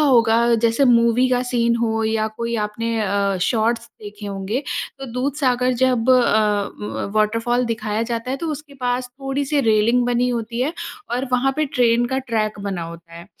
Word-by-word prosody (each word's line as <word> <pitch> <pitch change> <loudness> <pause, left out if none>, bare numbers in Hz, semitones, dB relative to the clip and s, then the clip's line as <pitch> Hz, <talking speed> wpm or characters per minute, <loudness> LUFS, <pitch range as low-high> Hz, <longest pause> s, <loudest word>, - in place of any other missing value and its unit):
होगा 235 -4 +4
जैसे 230 +4 +2
मूवी 235 +1 +4
का 250 0 +2
सीन 235 -1 +2
हो 225 -1 0
या 220 0 0
कोई 235 0 -2
आपने 230 +2 -3
अ, 200 -1 0
शॉट्स 230 +3 0
देखे 205 0 -10
होंगे, 200 +6 -3 0.4
तो 270 - -7
दूधसागर 255 -1 0
जब 250 -1 +2
अ, - - +8 0.7
व 210 - -4
वॉटरफॉल 230 +3 +1
दिखाया 220 -2 -2
जाता 230 +1 -3
है 265 - -1
तो 335 - -5
उसके 295 -1 -9
पास 250 0 -1
थोड़ी-सी 275 +2 0
रेलिंग 230 +1 +3
बनी 245 +1 +1
होती 235 0 -3
है 280 +5 0 0.4
और 245 +2 -1
वहाँ 260 +2 +2
पे 310 - +2
ट्रेन 240 -3 +2
का 265 +1 -1
ट्रैक 220 -5 -2
बना 195 -4 -3
होता 165 0 -10
है। 170 +2 -10
235 Hz, 175 wpm, -21 LUFS, 220-255 Hz, 0.7 s, अ